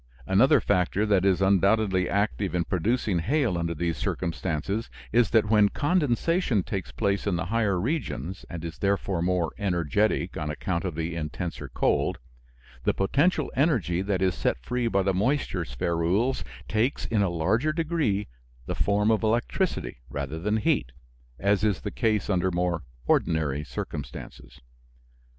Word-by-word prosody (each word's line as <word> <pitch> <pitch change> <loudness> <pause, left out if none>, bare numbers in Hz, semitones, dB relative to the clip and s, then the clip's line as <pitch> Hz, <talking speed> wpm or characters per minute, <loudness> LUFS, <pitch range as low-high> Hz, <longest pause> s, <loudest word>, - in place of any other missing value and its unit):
Another 130 - +5
factor 100 +1 +1
that 100 -3 +3
is 95 -1 +3
undoubtedly 100 0 +3
active 100 - 0
in 85 - +2
producing 95 +1 0
hail 120 - +1
under 85 0 -2
these 85 0 -1
circumstances 90 +4 -2 0.2
is 120 0 +4
that 110 -2 +4
when 105 -1 +4
condensation 150 - +1
takes 95 0 -4
place 100 -1 -1
in 100 - +1
the 85 0 -2
higher 105 -5 +2
regions, 95 - -3
and 85 -2 -6
is 85 0 -7
therefore 100 -3 0
more 90 -2 +1
energetic 95 +2 0
on 75 - -3
account 85 +4 -2
of 90 -4 -3
the 80 +1 -3
intenser 85 +2 -4
cold, - - +1 0.7
the - - +1
potential 140 - +1
energy 115 - +2
that 95 -1 0
is 95 -1 +2
set - - 0
free 120 - -2
by 100 -4 +2
the 95 0 +1
moisture 105 -2 0
spherules 85 - 0 0.2
takes, 115 +6 0
in 110 -3 +1
a 100 - +2
larger 100 - +1
degree, 155 - 0 0.4
the - - -3
form 105 +2 +2
of 110 - +2
electricity 120 - 0
rather 70 +3 -4
than 105 +5 0
heat, 110 - 0 0.4
as 100 +1 +1
is 105 -4 +1
the 105 - -4
case 110 -5 0
under 95 -2 +1
more 90 -1 0 0.2
ordinary 75 -2 +1
circumstances. - - -7
100 Hz, 150 wpm, -26 LUFS, 85-110 Hz, 0.7 s, Another